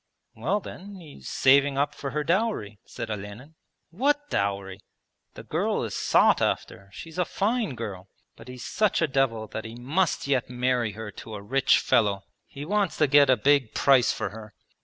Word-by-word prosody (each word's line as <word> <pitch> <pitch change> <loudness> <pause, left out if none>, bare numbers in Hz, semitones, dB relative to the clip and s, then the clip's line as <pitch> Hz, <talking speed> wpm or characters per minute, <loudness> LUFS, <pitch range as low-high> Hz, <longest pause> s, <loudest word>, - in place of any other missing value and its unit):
'Well 160 - -1
then, 200 +1 -10
he's 155 -5 -12
saving 140 +1 +3
up 145 +1 +1
for 140 - -5
her 150 +2 -2
dowry,' 170 - -1
said - - -6
Olenin. 105 +8 -8 0.4
'What 290 - 0
dowry? 100 -1 -2 0.6
The - - -9
girl - - -1
is - - -4
sought - - +3
after, 100 0 -2
she's 165 - -9
a - - +4
fine 210 - -1
girl. 100 -5 -7 0.3
But - - -14
he's 125 -1 -8
such 210 -5 +1
a - - +2
devil 130 -5 0
that 110 - -5
he 115 0 -8
must 150 +9 -1
yet 135 -4 0
marry 125 -3 0
her 110 0 -7
to 110 +2 -9
a 100 - -7
rich 135 +5 +3
fellow. 100 -3 +1 0.2
He 140 +1 -8
wants 200 +1 0
to 150 - +4
get 145 0 +5
a 130 - +5
big 140 0 +2
price 130 -4 +4
for - - -3
her. 110 -1 -11
135 Hz, 180 wpm, -26 LUFS, 110-160 Hz, 0.6 s, get